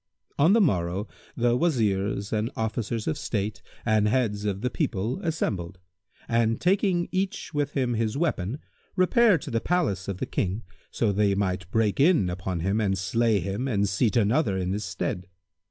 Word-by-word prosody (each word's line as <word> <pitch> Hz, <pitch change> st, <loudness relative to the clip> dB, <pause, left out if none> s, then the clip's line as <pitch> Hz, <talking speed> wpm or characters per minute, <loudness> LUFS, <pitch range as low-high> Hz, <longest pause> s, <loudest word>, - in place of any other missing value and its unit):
On 160 Hz, +7 st, +6 dB
the 230 Hz, -, +5 dB
morrow 95 Hz, -, +1 dB, 0.3 s
the 120 Hz, 0 st, +3 dB
Wazirs 105 Hz, -, 0 dB
and 110 Hz, +1 st, 0 dB
Officers 110 Hz, 0 st, -2 dB
of 80 Hz, -, -1 dB
State 105 Hz, -1 st, -2 dB, 0.2 s
and 110 Hz, -2 st, +3 dB
heads 105 Hz, -4 st, 0 dB
of 100 Hz, -1 st, -2 dB
the 125 Hz, +1 st, -1 dB
people 120 Hz, -, -1 dB
assembled; 100 Hz, -, -2 dB, 0.5 s
and, 115 Hz, -1 st, +1 dB
taking 185 Hz, -1 st, +2 dB
each 190 Hz, -2 st, -2 dB
with 145 Hz, -1 st, -1 dB
him 130 Hz, -3 st, 0 dB
his 110 Hz, +1 st, -1 dB
weapon, 135 Hz, -, -1 dB, 0.4 s
repaired 200 Hz, -, +4 dB
to -, -, -6 dB
the 115 Hz, -1 st, 0 dB
palace 150 Hz, -, 0 dB
of 100 Hz, -2 st, -3 dB
the -, -, -2 dB
King, 100 Hz, +4 st, -2 dB, 0.3 s
so 110 Hz, -3 st, 0 dB
they 100 Hz, 0 st, +2 dB
might 90 Hz, -2 st, -1 dB
break 110 Hz, 0 st, +1 dB
in 145 Hz, -, +4 dB
upon 90 Hz, -1 st, -3 dB
him 100 Hz, +5 st, +1 dB
and 95 Hz, -2 st, +1 dB
slay 115 Hz, +2 st, +1 dB
him 100 Hz, +9 st, -2 dB
and 100 Hz, -5 st, +1 dB
seat 105 Hz, +5 st, +1 dB
another 110 Hz, -1 st, +2 dB
in 95 Hz, 0 st, -1 dB
his 105 Hz, +1 st, -3 dB
stead. 90 Hz, 0 st, -3 dB
110 Hz, 170 wpm, -26 LUFS, 100-135 Hz, 0.5 s, On